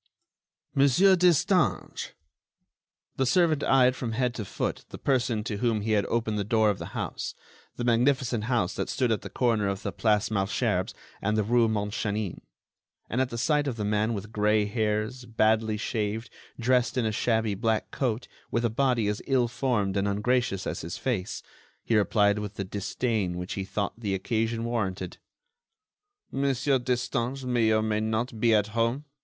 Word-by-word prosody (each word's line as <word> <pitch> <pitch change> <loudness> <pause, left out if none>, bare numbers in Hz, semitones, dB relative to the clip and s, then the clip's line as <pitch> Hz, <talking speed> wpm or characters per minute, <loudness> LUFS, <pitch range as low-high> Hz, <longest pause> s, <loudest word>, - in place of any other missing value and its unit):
"Monsieur 140 +8 +5
Destange!" 180 -4 +2 1.0
The 135 - +2
servant 160 0 +3
eyed 130 -1 +4
from 120 -3 -4
head 125 +1 0
to 110 -4 -5
foot - - -3
the - - -8
person 125 -5 0
to 105 -3 -3
whom 115 -1 +1
he 110 +2 -2
had 105 -2 +2
opened 110 -2 -1
the - - 0
door 110 +1 +3
of 100 - -5
the - - -8
house—the 120 - -6
magnificent 120 -1 +2
house 115 -6 +1
that - - -3
stood 125 -3 +1
at 110 - 0
the - - -7
corner 115 -5 +1
of 100 0 -3
the 100 - -2
Place 105 +1 +1
Malesherbes 100 -2 0 0.3
and 105 +2 0
the 110 - +2
rue 120 +2 +3
Montchanin—and 105 +2 -4
at 130 - 0
the 120 - -5
sight 145 +5 +1
of 130 - -2
the 105 -2 -3
man 105 +2 +1
with 105 +2 -6
gray 105 0 +2
hairs, 110 +3 -1
badly 110 -1 +2
shaved, 110 +1 -3 0.3
dressed 125 +1 +2
in 125 - +1
a 110 - +1
shabby 110 -1 +1
black 110 +2 -1
coat, 125 -3 -2 0.2
with 115 0 0
a 115 - +1
body 125 -3 +1
as 105 0 -1
ill 130 -3 +3
formed 115 -6 0
and 100 0 +1
ungracious 105 -1 0
as - - -3
his 85 +1 -5
face, 110 -8 -2 0.4
he 115 - +1
replied 105 0 +3
with 105 -1 -5
the 100 - -3
disdain 100 -1 -2
which 90 +1 -4
he 95 - -3
thought 100 +1 -2
the 100 -4 -1
occasion 115 +3 -1
warranted: 95 -6 -3 1.1
"Monsieur 135 0 +1
Destange 125 +1 -2
may 120 -3 +2
or 110 0 +3
may 110 -1 0
not 110 +2 -2
be 115 -1 +4
at 105 0 +2
home. 115 +6 0
110 Hz, 170 wpm, -27 LUFS, 105-125 Hz, 1.1 s, Monsieur